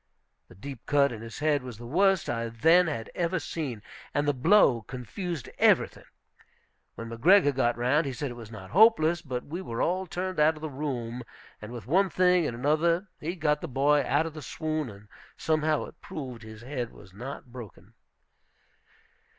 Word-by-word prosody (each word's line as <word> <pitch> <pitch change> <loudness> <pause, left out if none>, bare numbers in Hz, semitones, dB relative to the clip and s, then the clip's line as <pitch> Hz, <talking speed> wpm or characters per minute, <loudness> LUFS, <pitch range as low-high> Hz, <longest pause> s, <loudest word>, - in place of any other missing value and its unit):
"The - - -16
deep 130 +5 -9
cut 140 -1 +3
in 110 -2 -7
his 115 0 -8
head" 150 -1 +1
was 125 -4 -8
the 120 - -10
worst 190 +6 +2
I 115 -1 -2
then 165 +11 +4
had 130 -8 -4
ever 175 +1 0
seen, 145 - -4 0.3
and 145 0 +1
the 145 - +3
blow 140 - +4
confused 135 - -6
everything. - - +3 0.9
When 115 - -7
McGregor 145 - +5
got 120 -2 +1
round, 130 +5 +2
he - - -2
said 135 +1 -4
it - - -6
was 115 -3 -10
not 100 -4 -10
hopeless; 175 -5 +5
but 130 -5 -5
we 170 +5 -5
were 115 -10 -5
all 185 +2 0
turned 185 +1 -3
out 155 +1 +4
of 155 - -12
the 155 -1 -5
room, 125 -4 -4 0.4
and 105 +2 -8
with 120 -4 -8
one 190 - +3
thing 180 -3 +3
and 120 - -4
another 165 +8 +1
he 170 +4 -4
got 150 -3 0
the 170 - -4
boy 145 +2 +2
out 150 +3 +1
of 165 - -5
the 155 - -8
swoon, 155 +2 -3
and 105 0 -13 0.3
somehow 155 -1 +1
it - - -15
proved 130 -6 -7
his 110 0 -11
head 125 -2 -4
was 95 - -16
not 125 +3 -8
broken. 120 -5 -11
145 Hz, 190 wpm, -28 LUFS, 120-165 Hz, 0.9 s, McGregor